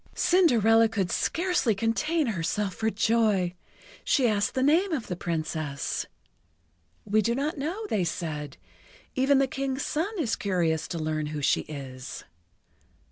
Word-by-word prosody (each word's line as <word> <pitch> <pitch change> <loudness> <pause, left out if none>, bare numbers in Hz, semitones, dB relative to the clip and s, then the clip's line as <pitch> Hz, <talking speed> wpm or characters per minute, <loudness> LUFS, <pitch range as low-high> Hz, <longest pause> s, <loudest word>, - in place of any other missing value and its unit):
Cinderella 230 - +4
could 195 -5 -1
scarcely 345 - +1
contain 300 - 0
herself 200 -1 -1
for 220 0 0
joy. 215 -4 +2 0.5
She 260 -4 +3
asked 205 0 0
the 260 - +1
name 335 +7 +3
of 265 -8 -2
the 180 - -4
Princess. 155 -4 -3 1.0
"We 215 +2 +3
do 235 +2 0
not 290 +3 -2
know," 355 +10 -3
they 205 - 0
said. 155 -4 -4 0.6
"Even 270 +2 +3
the 275 - +4
King's 270 +1 -3
son 325 +6 -1
is 255 -10 0
curious 170 -5 0
to 170 - -4
learn 155 -1 -2
who 150 -1 -4
she - - +3
is." 135 -3 -7
220 Hz, 140 wpm, -27 LUFS, 170-275 Hz, 1.0 s, Cinderella